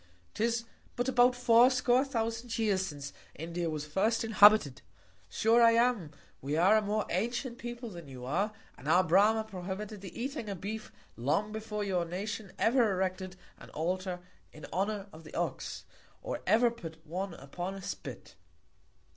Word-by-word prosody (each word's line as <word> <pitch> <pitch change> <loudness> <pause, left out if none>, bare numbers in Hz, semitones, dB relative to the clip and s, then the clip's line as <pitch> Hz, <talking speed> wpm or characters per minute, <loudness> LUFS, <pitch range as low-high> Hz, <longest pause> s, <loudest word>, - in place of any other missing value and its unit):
'Tis 235 +1 0 0.3
but 245 +1 -1
about 250 -1 +4
fourscore 245 +1 +5
thousand 230 -2 -3
Years, 200 -4 +1
since 140 -3 -7 0.2
India 170 +2 -3
was 150 -1 -3
first 205 +10 +1
inhabited. 210 - +6 0.5
Sure 225 - +3
I 230 0 +7
am, 230 -8 +2 0.3
we 145 +3 -2
are 190 +6 +5
a 215 - +4
more 210 +1 -1
antient 235 +6 -2
People 240 -1 -6
than 170 -4 -9
you 125 -2 -9
are, 185 +11 0 0.3
and 140 - -10
our 175 +4 +5
Brama 205 +6 +4
prohibited 195 +1 -6
the 190 0 -9
eating 255 -3 -4
of 195 -3 -5
Beef 215 +3 -5 0.2
long 155 - 0
before 215 -1 -4
your 185 -3 0
Nation 195 +3 -5
ever 230 -2 +3
erected 185 0 -2 0.2
an - - -12
Altar 180 +2 -2 0.3
in 155 - -11
Honour 200 +2 -1
of 160 +1 -12
the 155 - -11
Ox, 170 -5 -3 0.4
or - - -4
ever 230 +4 +5
put 165 -8 -10
one 180 +2 -4
upon 175 +7 -6
a 195 - -8
Spit. - - -7
205 Hz, 160 wpm, -31 LUFS, 175-230 Hz, 0.5 s, I